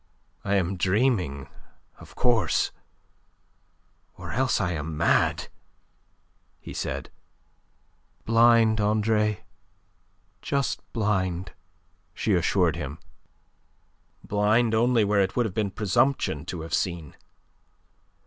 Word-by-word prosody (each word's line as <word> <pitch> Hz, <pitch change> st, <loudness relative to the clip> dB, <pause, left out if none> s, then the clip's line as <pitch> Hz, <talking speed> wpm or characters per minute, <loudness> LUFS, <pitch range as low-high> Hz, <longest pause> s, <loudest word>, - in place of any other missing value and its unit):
"I 100 Hz, 0 st, 0 dB
am 95 Hz, 0 st, 0 dB
dreaming, 95 Hz, -, 0 dB, 0.5 s
of -, -, -14 dB
course, 115 Hz, -8 st, +1 dB, 1.5 s
or -, -, -7 dB
else 130 Hz, -1 st, +1 dB
I 95 Hz, -4 st, 0 dB
am 80 Hz, -1 st, -4 dB
mad," 85 Hz, -, +2 dB, 1.1 s
he -, -, -9 dB
said. -, -, -4 dB, 1.1 s
"Blind, 115 Hz, -1 st, +4 dB
Andre; 105 Hz, 0 st, +1 dB, 1.0 s
just 140 Hz, -2 st, -1 dB
blind," 95 Hz, -5 st, -1 dB, 0.6 s
she 110 Hz, -, 0 dB
assured 90 Hz, -2 st, +2 dB
him. 75 Hz, -1 st, -5 dB, 1.3 s
"Blind 110 Hz, +3 st, +2 dB
only 115 Hz, 0 st, +3 dB
where 100 Hz, 0 st, +2 dB
it 95 Hz, -, -1 dB
would 120 Hz, -, +2 dB
have 105 Hz, -, -4 dB
been 105 Hz, -1 st, -1 dB
presumption 100 Hz, -, 0 dB
to 85 Hz, -1 st, -5 dB
have 80 Hz, -, -7 dB
seen." 85 Hz, -5 st, -2 dB
105 Hz, 100 wpm, -26 LUFS, 90-115 Hz, 1.5 s, Blind